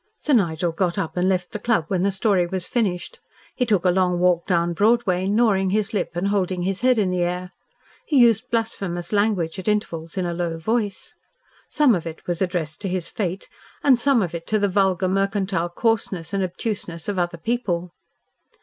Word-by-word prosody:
Sir 300 - -1
Nigel 175 -6 +2
got 170 +1 -1
up 160 - -3
and 180 +1 +1
left 180 -1 -1
the 210 - -4
club 220 -7 +1
when 185 -3 0
the 200 +1 +2
story 190 -2 +1
was 185 0 -3
finished. 195 -7 -2 0.4
He 250 - 0
took 200 -5 +2
a 180 - +5
long 180 -1 +2
walk 175 -1 +2
down 170 -2 +1
Broadway, 200 -2 +2
gnawing 200 -3 +2
his 215 +3 0
lip 205 - -1
and 185 +3 0
holding 185 -3 0
his 195 +2 -2
head 255 -1 +4
in 195 -4 +1
the 180 -1 0
air. 180 +1 -2 0.6
He 290 - +2
used 235 -1 +4
blasphemous 195 -6 -2
language 200 -5 +1
at 190 - -8
intervals 170 -5 -2
in 185 - 0
a 175 - -2
low 170 -1 -2
voice. 205 +3 -2 0.6
Some 295 -6 +4
of 170 -4 -2
it 160 0 -8
was 175 0 -3
addressed 175 -4 -2
to 195 - -2
his 180 -2 -2
fate 190 -2 -3 0.4
and 265 -4 +5
some 265 -4 +3
of 175 -2 -4
it 165 -1 -6
to 215 - +2
the 205 -1 +2
vulgar 190 -1 +1
mercantile 195 -2 0
coarseness 200 -3 -1
and 195 -1 +1
obtuseness 180 -3 -4
of 200 -3 -1
other 175 -1 -1
people. 180 -4 -2
190 Hz, 200 wpm, -23 LUFS, 175-210 Hz, 0.6 s, a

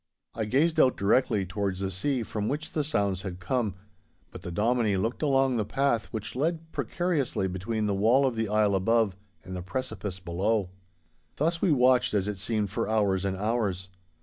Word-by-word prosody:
I 110 - -2
gazed 145 +9 +2
out 130 - +4
directly 100 -1 +2
towards 95 0 -2
the 95 -1 -1
sea, 125 +7 -1
from 105 -1 -3
which 150 +3 -3
the 155 - 0
sounds 100 - 0
had 90 -2 -6
come; 105 +1 -1 0.6
but 90 - -9
the 90 - -6
Dominie 110 +1 +1
looked 110 +6 -2
along 135 -4 +2
the 110 - +1
path 120 +1 0
which 110 0 -6
led 160 +3 -1
precariously 145 - -1
between 105 +4 -2
the 105 - +1
wall 115 +8 +4
of 130 -3 0
the 110 -2 -1
isle 105 -1 +3
above 105 +1 +2 0.3
and 95 0 -7
the 90 - -4
precipice 100 -2 -4
below. 95 +3 -1 0.6
Thus 165 +3 0
we 180 - +3
watched 125 -4 +4
as 100 -1 +1
it 105 -2 -3
seemed 105 -1 -1
for 105 - -2
hours 100 -4 +1
and 95 -1 -1
hours. 100 -3 -1
110 Hz, 185 wpm, -28 LUFS, 95-130 Hz, 0.6 s, out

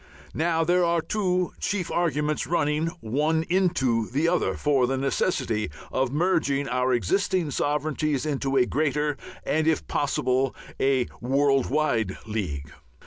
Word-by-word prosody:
Now, 165 0 +1
there 175 +2 +3
are 170 0 +2
two 180 +1 0
chief 195 -4 -2
arguments, 155 -3 0
running 155 -1 +1
one 150 +8 +1
into 165 - +1
the 145 +6 +1
other, 180 +1 +1
for 140 -4 +2
the 135 +1 -1
necessity 130 - 0 0.2
of 130 -1 0
merging 145 -3 +1
our 125 0 +1
existing 155 - +1
sovereignties 150 0 -1
into 135 -2 -1
a 125 - +5
greater 150 +1 0 0.3
and, 155 +1 +1
if 160 - +1
possible, 135 -2 0 0.2
a 135 -2 +2 0.2
world 135 +1 +2
wide 120 -9 0
league. 75 -11 -4
145 Hz, 135 wpm, -25 LUFS, 130-160 Hz, 0.3 s, a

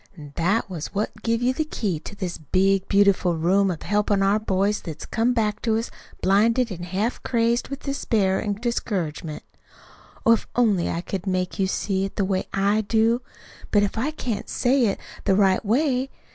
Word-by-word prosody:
That 185 +7 +1
was 180 -1 -6
what 210 +2 0
give 230 +1 0
you 255 +1 +2
the 315 - 0
key 205 - -2
to 205 - -9
this 185 -4 -4
big, 190 +5 +1
beautiful 200 -4 +3
room 190 +4 +3
of 170 -4 -4
helpin' 205 -1 +1
our 200 +2 +3
boys 200 0 0
what's 160 -4 -7
come 235 +2 +1
back 215 -2 0
to 225 -2 +1
us, 225 - -3 0.3
blinded, 225 +5 +3
an' 175 -2 -6
half 190 +7 -2
crazed 235 0 +1
with 275 0 -7
despair 210 -9 0
an' 205 - -1
discouragement. 185 -9 -3 0.8
Oh, 230 - +6
if 230 - -1
I 245 - +3
only 190 -7 +1
could 195 0 -5
make 185 0 -1
you 190 - +2
see 190 0 -1
it 195 - -7
the 200 - +1
way 190 -1 -1
I 200 +2 +2
do! 230 +2 +2 0.5
But 205 -1 +2
I 240 +7 0
can't 245 -9 -4
say 250 -1 +2
it 200 - -1 0.3
the 195 - +3
right 195 -2 +3
way. 260 +3 +1
205 Hz, 185 wpm, -24 LUFS, 190-230 Hz, 0.8 s, Oh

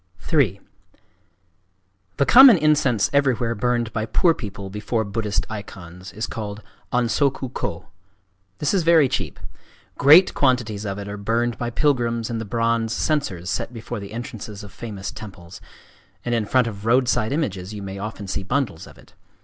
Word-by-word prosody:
III 110 - +3 1.6
The 140 - +3
common 255 - +9
incense 150 -8 +2
everywhere 125 -5 +2
burned 120 0 -1
by 110 0 -2
poor 170 +6 +3
people 100 -6 -7
before 110 +2 -2
Buddhist 105 0 -2
icons 95 -4 -9
is 110 +2 -4
called 105 -1 -6 0.3
an 125 0 +2
soku 130 +1 0
kō. 85 -7 -4 0.7
This 150 - 0
is 190 - +3
very 165 -3 +5
cheap. - - -3 0.6
Great 155 +7 +7
quantities 120 -6 0
of 100 -1 -3
it 100 0 -6
are 100 0 -6
burned 115 +3 -1
by 120 - -2
pilgrims 120 -4 0
in 115 - -2
the 115 - -5
bronze 115 +1 0
censers 100 - -1
set 125 - -3
before 115 0 -6
the 100 0 -9
entrances 110 -3 -7
of 100 -2 -12
famous 100 -5 -6
temples; 95 -5 -11 0.6
and 120 - -1
in 115 -3 0
front 130 +2 +3
of 105 -1 -6
roadside 125 -2 +2
images 100 - -2
you 105 -2 -7
may 100 0 -6
often 105 0 -6
see 95 - -2
bundles 120 - -2
of - - -15
it. - - -19
115 Hz, 165 wpm, -22 LUFS, 100-125 Hz, 1.6 s, common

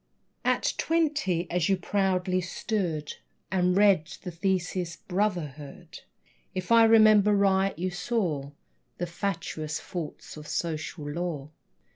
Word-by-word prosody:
At - - +1
twenty, 300 - +1
as 175 0 +1
you 195 - +3
proudly 185 -1 0
stood 175 -4 -3 0.3
And 180 -1 +2
read 195 -5 +4
your 180 - -4
thesis, 175 0 -1
"Brotherhood," 170 -8 -3 0.6
If 185 +3 -4
I 230 -1 +8
remember 215 -2 +6
right, 195 -2 +2
you 185 +2 -2
saw 180 - -1 0.5
The 175 - -2
fatuous 170 -4 -3
faults 170 -4 -7
of 150 0 -9
social 160 -2 -3
law. 150 -2 -4
180 Hz, 115 wpm, -27 LUFS, 165-200 Hz, 0.6 s, I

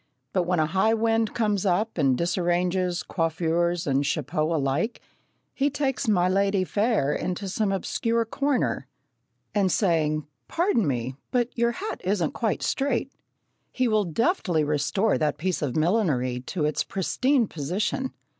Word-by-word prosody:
But 180 -2 +1
when 180 -2 +1
a 155 - +3
high 190 +8 +2
wind 225 0 +1
comes 210 -4 +1
up 200 +1 0
and 135 -4 +3
disarranges 175 +1 0
coiffures 170 0 0
and 140 0 +1
chapeaux 155 +2 -1
alike, 145 - -1 0.5
he 280 +1 +1
takes 275 -3 -1
"my 180 -4 +3
ladye 195 +1 +2
fair" 205 - +1
into 185 +2 -3
some 195 +2 0
obscure 230 +4 0
corner, 275 +3 -1 0.7
and 195 -3 +2
saying, 155 -6 +1 0.2
"Pardon 335 - +1
me, 130 0 -2
but 245 -1 0
your 235 0 +1
hat 415 - -5
isn't 185 -4 0
quite 220 -3 -1
straight," 270 -1 0 0.6
he 255 -1 +1
will 215 -2 +2
deftly 175 - +1
restore 150 +9 +1
that 150 -1 0
piece 185 +2 -1
of 140 -5 -2
millinery 155 - +1
to 165 -5 -1
its 150 - 0
pristine 250 - +1
position. 190 - -2
185 Hz, 145 wpm, -25 LUFS, 160-225 Hz, 0.7 s, a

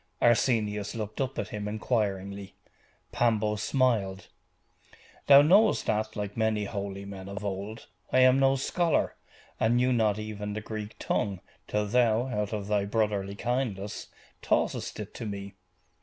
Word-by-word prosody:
Arsenius 110 -4 +2
looked 110 +2 -4
up 135 0 -2
at 105 - -3
him 105 -1 -4
inquiringly. 100 -3 -2 0.6
Pambo 110 -3 +1
smiled. 105 -4 0 1.0
'Thou 140 0 +9
knowest 200 +8 +4
that, 110 +1 -1
like 105 -1 -4
many 110 -2 +1
holy 100 -1 -5
men 100 -1 -8
of 100 +1 -6
old, 100 +3 -5 0.3
I 130 - +5
am 130 +1 +6
no 135 0 +4
scholar, 165 +5 +1 0.5
and 115 +2 +3
knew 125 +1 +3
not 110 -3 +2
even 105 -1 -5
the 105 - -3
Greek 110 0 -6
tongue, 100 -3 -1 0.3
till 105 0 0
thou, 115 +1 +2
out 105 -3 -2
of 105 -2 -3
thy 105 -1 +1
brotherly 100 -2 -1
kindness, 110 -4 -3 0.3
taughtest - - 0
it - - -7
to 115 - -6
me. 100 -1 -6
105 Hz, 145 wpm, -28 LUFS, 100-120 Hz, 1.0 s, Thou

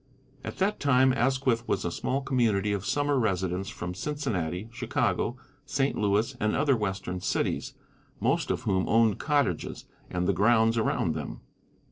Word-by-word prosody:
At - - -6
that 200 +2 0
time 130 -2 +4
Asquith 130 -1 +1
was - - 0
a 85 - -1
small 135 +9 -1
community 110 -7 +1
of 100 -1 -3
summer 145 -1 +1
residents 95 -3 -1
from 90 -3 -5
Cincinnati, 100 - -3
Chicago, 120 0 -1 0.3
St. 135 -1 0
Louis, 105 +5 +1
and 105 0 +1
other 140 -1 +3
western 95 -4 -3
cities, - - -1 0.4
most - - +1
of - - -1
whom 95 -1 0
owned 115 -2 +3
cottages 145 - 0 0.2
and 90 0 -1
the 100 - +3
grounds 110 +4 +4
around 110 -7 +1
them. 75 -2 -6
110 Hz, 150 wpm, -28 LUFS, 95-130 Hz, 0.4 s, time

